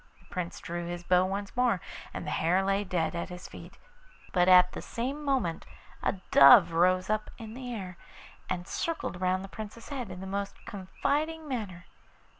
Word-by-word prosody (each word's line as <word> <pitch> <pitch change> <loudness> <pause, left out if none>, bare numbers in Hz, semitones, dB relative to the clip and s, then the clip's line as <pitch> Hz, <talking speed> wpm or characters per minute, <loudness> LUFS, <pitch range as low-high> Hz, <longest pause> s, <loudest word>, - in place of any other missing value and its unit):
The - - -24
Prince 180 -2 -4
drew 170 0 -5
his 175 0 -5
bow 180 +1 +3
once 200 +1 -4
more, 245 -6 +2 0.3
and - - -6
the - - -3
hare 180 +4 +2
lay 195 +1 +1
dead 180 -4 -1
at 170 +1 -3
his 180 0 -8
feet; - - -12 0.6
but 180 -1 +4
at 180 0 +7
the - - -6
same 270 +6 -4
moment 260 - 0 0.4
a - - +1 0.2
dove 140 +4 +9
rose 185 +2 +3
up 215 0 -1
in 220 -1 -8
the 250 0 -6
air, 185 -6 -6 0.5
and 175 0 -3
circled 325 - -3
round 185 +1 +1
the - - -7
Prince's 220 +3 -9
head 260 -7 -4
in 180 -1 -7
the 190 - -6
most 200 +1 -3
confiding 300 - -2
manner. 205 -10 -4
190 Hz, 185 wpm, -29 LUFS, 180-230 Hz, 0.6 s, dove